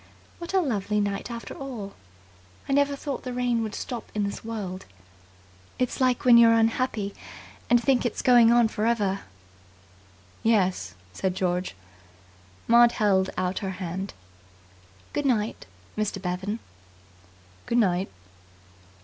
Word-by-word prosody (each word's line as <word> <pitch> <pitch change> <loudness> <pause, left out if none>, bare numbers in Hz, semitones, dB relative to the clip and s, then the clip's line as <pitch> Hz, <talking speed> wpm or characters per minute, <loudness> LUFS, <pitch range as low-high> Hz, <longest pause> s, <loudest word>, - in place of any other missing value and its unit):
"What 345 +2 -5
a 380 - +5
lovely 210 - -1
night 200 +2 -2
after 235 -1 -6
all! 240 -8 -7 0.7
I 275 - 0
never 285 0 +3
thought 280 -2 -5
the 255 - -5
rain 245 -2 0
would 215 -2 -4
stop 240 -3 -6
in 210 - +1
this 200 0 -4
world. 200 -5 -5 0.9
It's 250 +1 -1
like 255 -1 +2
when 240 -2 +8
you're 230 -1 +7
unhappy 225 -2 0 0.6
and 240 +1 +6
think 245 +1 +2
it's 240 - -2
going 240 -2 +6
on 240 -1 +5
for 215 0 -2
ever." 205 -4 +1 1.2
"Yes," 185 - +1 0.2
said 185 - -2
George. 180 - -1 0.9
Maud 235 0 +6
held 190 -3 +2
out 185 0 -1
her 195 - -3
hand. 190 +2 -5 1.0
"Good 290 -1 0
night, 220 - -1 0.3
Mr. 215 -2 -2
Bevan." 190 +3 -3 1.1
"Good 235 - +1
night." 190 -4 +2
225 Hz, 130 wpm, -26 LUFS, 195-245 Hz, 1.2 s, when